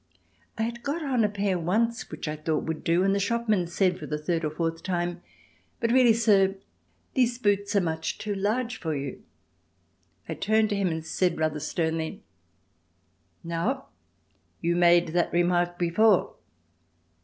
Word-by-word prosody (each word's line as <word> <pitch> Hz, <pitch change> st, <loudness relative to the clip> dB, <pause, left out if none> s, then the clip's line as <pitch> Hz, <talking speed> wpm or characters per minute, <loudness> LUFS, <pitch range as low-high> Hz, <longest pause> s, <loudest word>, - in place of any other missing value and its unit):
I 220 Hz, -, 0 dB
had 235 Hz, +1 st, -4 dB
got 295 Hz, +5 st, -3 dB
on 255 Hz, -5 st, +1 dB
a 210 Hz, -, +2 dB
pair 200 Hz, -3 st, -1 dB
once 225 Hz, +8 st, 0 dB
which 155 Hz, 0 st, -6 dB
I 150 Hz, -, -2 dB
thought 155 Hz, 0 st, -1 dB
would 160 Hz, -1 st, -4 dB
do, 170 Hz, +2 st, +2 dB
and 195 Hz, 0 st, +3 dB
the 200 Hz, -, +1 dB
shopman 215 Hz, -3 st, 0 dB
said 180 Hz, +1 st, +1 dB
for -, -, -7 dB
the 150 Hz, -, -2 dB
third 165 Hz, +2 st, -2 dB
or 155 Hz, -, 0 dB
fourth 165 Hz, +1 st, -3 dB
time: 175 Hz, -1 st, -2 dB, 0.6 s
"But 230 Hz, -2 st, 0 dB
really, 250 Hz, -1 st, +6 dB
sir, 200 Hz, -4 st, +3 dB, 0.6 s
these 245 Hz, -2 st, +2 dB
boots 205 Hz, -3 st, 0 dB
are 200 Hz, -, +5 dB
much 160 Hz, -2 st, -2 dB
too 210 Hz, -1 st, -3 dB
large 225 Hz, +5 st, -1 dB
for 160 Hz, -3 st, -2 dB
you." 140 Hz, -1 st, -5 dB, 1.1 s
I -, -, -3 dB
turned 220 Hz, +1 st, +2 dB
to 205 Hz, -, 0 dB
him 200 Hz, -1 st, +1 dB
and 160 Hz, -2 st, -3 dB
said 175 Hz, +1 st, 0 dB
rather 155 Hz, -1 st, 0 dB
sternly, 160 Hz, +1 st, -2 dB, 1.2 s
"Now, 170 Hz, +12 st, -2 dB, 0.7 s
you 170 Hz, +1 st, 0 dB
made 175 Hz, -1 st, +5 dB
that 175 Hz, +1 st, 0 dB
remark 175 Hz, 0 st, +1 dB
before." 180 Hz, +6 st, +3 dB
180 Hz, 165 wpm, -27 LUFS, 165-220 Hz, 1.2 s, really